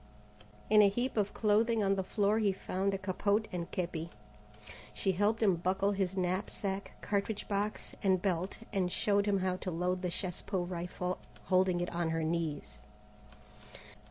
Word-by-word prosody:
In 210 0 +7
a 200 - +7
heap 240 +6 -1
of 205 -2 +1
clothing 220 +1 +2
on 195 0 +3
the 195 - 0
floor 205 +3 +1
he 205 -3 +3
found 190 +1 -1
a 195 - -1
capote 200 +2 0
and 175 -1 -4
képi. 170 -2 -3 0.9
She 190 - +2
helped 205 +4 +1
him 190 -5 +4
buckle 190 +3 +1
his 195 -1 -1
knapsack, 190 +2 -2
cartridge 205 +1 -1
box, 205 +1 -2
and 190 -2 +3
belt, 185 0 -1 0.2
and 185 -3 +1
showed 205 +1 +2
him 200 -1 +3
how 185 -1 0
to 185 - -4
load 180 +2 -1
the 180 - -1
chasse 180 +1 -1
pot 185 -3 -2
rifle, 180 +1 -3 0.2
holding 185 -1 +2
it 175 - -3
on 170 -1 0
her 165 0 0
knees. 160 -2 -2
190 Hz, 165 wpm, -32 LUFS, 180-205 Hz, 0.9 s, In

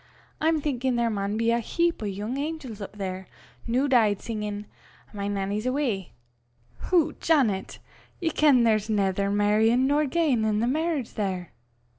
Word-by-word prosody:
I'm 315 0 +2
thinkin' 260 -3 -1
there 235 -1 +1
maun 200 0 -2
be 230 +1 +2
a 235 - +2
heap 340 +7 0
o' 215 - -2
yoong 210 +7 -4
angels 285 -8 -5
up 200 +1 -8
there, 190 -1 -5 0.4
new 255 +5 +1
deid, 220 -7 +3
singin', 210 -2 -4 0.5
'My 200 -1 -3
Nannie's 205 +3 -2
Awa.'" 255 -9 -1 0.8
"Hoots, 350 -4 +1
Janet! 250 -12 +2 0.4
ye 330 -2 0
ken 285 -6 +4
there's 215 -2 +2
naither 200 -2 +1
merryin' 215 +5 +3
nor 290 +2 +2
giein' 280 -6 +1
in 220 +3 +1
merriage 310 -4 -1
there." 190 -5 -3
230 Hz, 150 wpm, -26 LUFS, 205-280 Hz, 0.8 s, ken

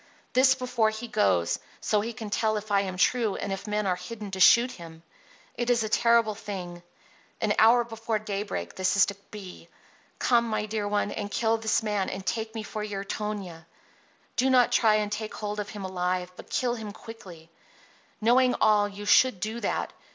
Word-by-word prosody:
This 260 +1 +5
before 245 -4 +1
he 220 +2 -6
goes, 90 - +1 0.2
so 210 - +1
he 225 +3 -4
can 220 -3 -8
tell 215 +1 +1
if 210 0 -7
I 200 -1 +4
am 185 -2 -4
true 225 +1 +2
and 200 - -3
if 195 +2 -6
men 210 0 -1
are 185 -2 +1
hidden 205 +3 -8
to 190 - -5
shoot 235 +7 +6
him. 165 -4 -12 0.5
It 240 0 -3
is 240 -2 +3
a 215 - -3
terrible 230 -1 +3
thing. 185 -4 -7 0.6
An 210 -1 +1
hour 235 +2 +6
before 225 -1 -3
daybreak 200 - -4
this 185 0 0
is 195 - +7
to 200 - -5
be. 200 -4 -10 0.5
Come, 235 -2 +3
my 215 -1 -1
dear 215 -1 -3
one, 205 0 0
and 205 -2 -4
kill 225 +2 +1
this 220 0 +1
man 210 -3 -1
and 190 0 -6
take 220 +2 -3
me 220 - -4
for 215 0 -5
your 200 -2 -4
Tonia. 195 -6 -5 0.7
Do 260 +2 +3
not 250 -2 +4
try 215 -2 +4
to - - -3
take 215 +1 -5
hold 210 0 -4
of 205 -1 -4
him 200 -2 -6
alive, 180 -1 -2
but - - -12
kill 245 -1 0
him 220 -3 -6
quickly. 180 -8 -12 0.7
Knowing 250 +3 +4
all, 210 -1 +4
you 205 +1 -9
should 255 -1 +4
do 220 +4 -3
that. - - -2
210 Hz, 195 wpm, -27 LUFS, 195-225 Hz, 0.7 s, is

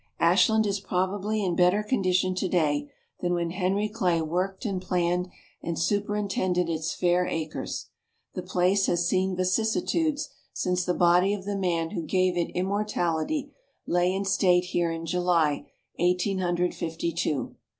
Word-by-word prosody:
Ashland 210 +6 +4
is 200 -1 0
probably 200 +3 -1
in 180 -3 0
better 180 +4 +3
condition 185 -5 +1
today 155 -6 0 0.3
than 175 0 0
when 170 -1 -1
Henry 195 +3 0
Clay 185 -6 0
worked 180 +7 -2
and 195 -4 -2
planned, 180 0 0 0.3
and 170 -1 -3
superintended 195 -2 0
its 160 -1 -2
fair 180 0 +2
acres. 155 -1 -4 0.4
The 185 - -4
place 185 +2 +1
has 175 0 +1
seen 185 0 +1
vicissitudes 225 - 0 0.3
since 180 0 -1
the 180 - 0
body 180 +3 +4
of 190 -2 -9
the 205 0 -2
man 170 -4 -1
who - - -3
gave 185 +3 +1
it 175 -1 0
immortality 200 - -1 0.3
lay 175 +1 +2
in 195 +1 -2
state 185 -2 +3
here 175 -2 0
in 165 0 -4
July, 170 -3 +1 0.3
Eighteen 180 +2 +1
Hundred 175 -1 0
Fifty 165 0 -3
two. 155 -4 -2
180 Hz, 150 wpm, -27 LUFS, 175-195 Hz, 0.4 s, Ashland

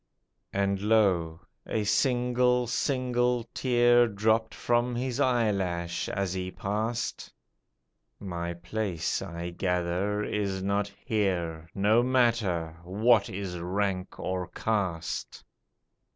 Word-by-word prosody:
And 100 0 0
lo, 95 -7 +2 0.3
a 110 - -1
single, 125 +2 +2
single 125 -1 0
tear 120 -1 +4
Dropped 110 +2 +1
from 120 +1 +1
his 125 +1 -2
eyelash 100 -10 0
as 95 -2 -1
he 95 0 -3
past, 110 +5 -3 0.9
"My 85 -3 -4
place 85 0 -2
I 85 +1 -5
gather 90 +3 -1
is 100 -3 -2
not 100 +1 0
here; 85 -7 -1
No 105 +4 +4
matter, 115 -10 +1
what 105 +4 +3
is 95 -2 -5
rank 95 +1 -2
or 90 -1 -2
caste? 90 -4 -2
100 Hz, 100 wpm, -28 LUFS, 90-120 Hz, 0.9 s, tear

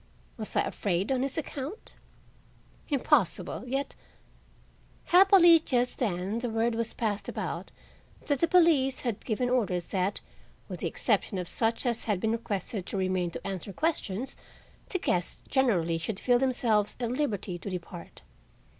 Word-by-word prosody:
Was 215 -2 -6
I - - +4
afraid 195 +3 -1
on 260 -1 +1
his 275 +2 -1
account? 300 - -5 1.0
Impossible; 275 - +1
yet— 270 +2 -2 1.1
Happily 355 -2 +7
just 250 -5 0
then 200 -1 -1
the 245 0 -2
word 225 +1 +1
was 230 0 -2
passed 210 -3 -2
about - - -4 0.6
that 285 -3 +1
the 335 - +3
police 320 -7 +4
had 235 -5 -3
given 245 +2 -1
orders 200 -9 0
that, 190 +1 0 0.5
with - - -6
the - - -1
exception 200 - 0
of 180 -1 -3
such 225 +6 -1
as 235 -2 0
had 210 -4 0
been 220 +3 0
requested 205 -3 -3
to - - -3
remain 185 -2 0
to - - -8
answer 195 0 -5
questions, 265 - -2 0.5
the 370 - 0
guests 180 - -1
generally 180 - +2
should 190 +4 -4
feel 245 -1 +3
themselves 235 -5 +1
at 240 -2 -1
liberty 210 -10 -2
to 200 - -6
depart. 175 -1 -8
230 Hz, 150 wpm, -29 LUFS, 190-265 Hz, 1.1 s, Happily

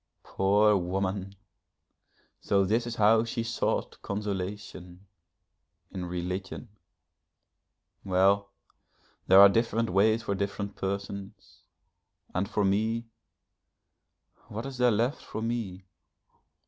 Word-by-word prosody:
Poor 105 +2 +3
woman! 95 +1 -2 1.0
so 100 -1 +2
this 115 +5 0
is 120 - -4
how 110 +1 +4
she 115 0 -3
sought 115 0 -2
consolation, 100 -2 -5 0.9
in 90 -1 -5
religion! 90 +5 -5 1.3
Well, 100 +2 +2 0.8
there 95 +1 +8
are 100 - +11
different 115 +1 0
ways 110 +4 +3
for 100 - -1
different 100 0 -3
persons 100 +1 -6 0.7
and 95 +2 -1
for 105 -3 0
me 110 +4 0 1.4
what 110 +4 -6
is 135 -2 -7
there 125 0 +5
left 120 +6 0
for 110 - -6
me? 110 -6 -4
100 Hz, 100 wpm, -28 LUFS, 95-110 Hz, 1.4 s, are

